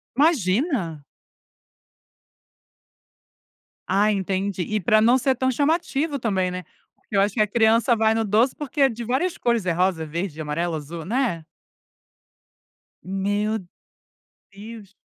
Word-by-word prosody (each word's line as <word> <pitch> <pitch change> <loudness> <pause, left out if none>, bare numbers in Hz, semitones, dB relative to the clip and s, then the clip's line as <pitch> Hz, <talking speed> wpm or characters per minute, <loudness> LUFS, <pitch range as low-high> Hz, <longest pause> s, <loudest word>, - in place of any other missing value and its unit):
Imagina. 230 - +1 2.8
Ah, 200 +3 +3
entendi 190 -1 -2
e 215 +3 -2
pra 215 +4 +3
não 240 +4 +5
ser 260 +1 +1
tão 260 +1 0
chamativo 290 +1 0
também, 195 -6 0
né? 180 0 -5 0.3
Porque 205 - -9
eu 195 - +5
acho 205 +2 0
que 215 - +2
a 210 - +3
criança 230 +2 +3
vai 220 0 +2
no 225 - 0
doce 220 +5 +2
porque 295 0 -4
é 270 - +6
de 235 0 -6
várias 270 +10 -1
cores, 235 -5 0
é 180 - +1
rosa, 175 -2 0
verde, 160 0 -4
amarelo, 165 +3 -2
azul, 160 +2 -7
né. 220 -8 -1 1.6
Meu 205 +4 -1 0.9
Deus. 205 -1 -11
210 Hz, 130 wpm, -23 LUFS, 185-240 Hz, 2.8 s, é